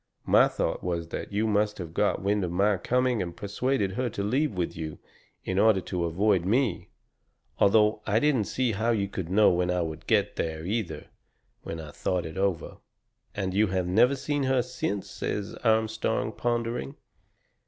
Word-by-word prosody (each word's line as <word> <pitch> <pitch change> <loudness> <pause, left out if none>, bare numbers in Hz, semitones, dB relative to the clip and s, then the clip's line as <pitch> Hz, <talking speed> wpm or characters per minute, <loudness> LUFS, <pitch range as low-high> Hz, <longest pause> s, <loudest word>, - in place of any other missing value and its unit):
My - - +6
thought - - -2
was 85 -2 -2
that - - -5
you 105 +2 0
must 105 -1 +1
have 85 -3 -7
got 105 0 +1
wind 100 0 +1
of 90 - -2
my 100 +3 +2
coming 125 +3 +1
and 85 -2 -5
persuaded 105 +1 -1
her 125 +4 -1
to 100 -2 -4
leave 130 +8 +1
with 90 -3 -2
you 80 -2 -5 0.5
in 95 +1 0
order 110 -2 +5
to 90 -1 -3
avoid 95 +2 +2
me 115 +2 0 0.7
although 105 +1 +4
I 110 +1 +3
didn't 135 -6 +2
see 130 +2 0
how 110 +3 -1
you 105 -4 +1
could 95 -4 -5
know 105 +3 +5
when 90 0 0
I 90 0 +1
would 80 -1 -6
get 105 -2 +1
there, 80 0 -3
either, 95 -6 -3 0.6
when 80 - -6
I 75 -2 -8
thought 90 +3 -2
it 80 - -7
over." 95 -3 -1 0.6
"And 95 -2 -2
you 105 +2 +3
have 95 -1 -1
never 115 +9 +4
seen 145 +2 -2
her 130 -2 +2
since," 105 -5 -3
says 105 -1 -4
Armstrong, 110 -1 +1
pondering. 115 - -2
100 Hz, 180 wpm, -27 LUFS, 90-110 Hz, 0.7 s, My